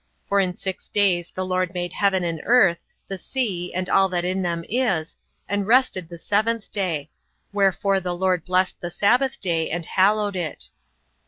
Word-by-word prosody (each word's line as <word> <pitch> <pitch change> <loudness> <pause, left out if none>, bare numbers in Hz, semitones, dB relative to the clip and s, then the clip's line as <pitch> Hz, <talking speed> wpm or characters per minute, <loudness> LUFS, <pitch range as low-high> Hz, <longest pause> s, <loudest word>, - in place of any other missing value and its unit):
For 200 - +2
in 185 -2 0
six 190 -1 -5
days 180 -4 +1
the 185 - -4
LORD 185 0 -1
made 175 -1 -3
heaven 195 -3 +2
and 165 -2 -2
earth, 200 -8 +4 0.2
the 195 -1 -5
sea, 190 -8 -2
and 185 0 -2
all 195 +1 +4
that 175 -1 -1
in 185 +1 0
them 170 -2 -2
is, 200 -10 0 0.3
and 205 -1 -1
rested 225 -8 +3
the 170 - -8
seventh 215 +4 0
day: 165 -7 -2 0.4
wherefore 195 0 +2
the 180 -1 -3
LORD 180 -2 +1
blessed 185 0 0
the 175 - -3
sabbath 250 +9 +2
day, 165 -4 0
and 170 0 -2
hallowed 205 +2 +2
it. 170 -4 -3
185 Hz, 175 wpm, -23 LUFS, 175-200 Hz, 0.4 s, earth